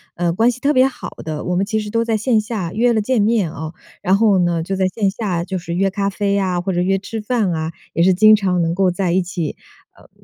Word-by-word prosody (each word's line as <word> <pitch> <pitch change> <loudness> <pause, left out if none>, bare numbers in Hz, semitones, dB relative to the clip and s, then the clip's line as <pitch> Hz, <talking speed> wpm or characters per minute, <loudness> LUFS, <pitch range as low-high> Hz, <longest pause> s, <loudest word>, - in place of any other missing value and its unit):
呃， 170 -1 0
关 225 +7 +3
系 245 0 -4
特 285 +3 +1
别 260 -1 +5
好 265 - -7
的， 155 -1 -5
我 180 - -2
们 185 - +1
其 220 0 0
实 210 -1 -5
都 230 +1 +1
在 225 -1 0
线 220 0 +2
下 210 -6 -4
约 240 +3 +2
了 220 - +1
见 225 +2 +1
面 210 -5 +1
哦。 160 0 -7 0.3
然 190 +2 +3
后 205 -3 +3
呢， 170 -2 +1
就 195 +3 -3
在 190 0 +1
线 195 +1 -1
下 190 -5 -2
就 185 +1 -4
是 170 0 -5
约 195 +2 +1
咖 200 0 -1
啡 200 0 -1
呀， 190 -3 0
或 185 +2 -2
者 175 - 0
约 195 +2 +1
吃 215 +3 -6
饭 215 -3 0
啊， 160 0 -3 0.2
也 165 - 0
是 185 +1 +4
经 215 +3 +7
常 190 -4 0
能 165 0 0
够 190 +1 +2
在 180 0 -1
一 185 +2 +2
起， 175 -3 -4 0.4
呃， - - -20
195 Hz, 285 characters per minute, -19 LUFS, 175-215 Hz, 0.4 s, 经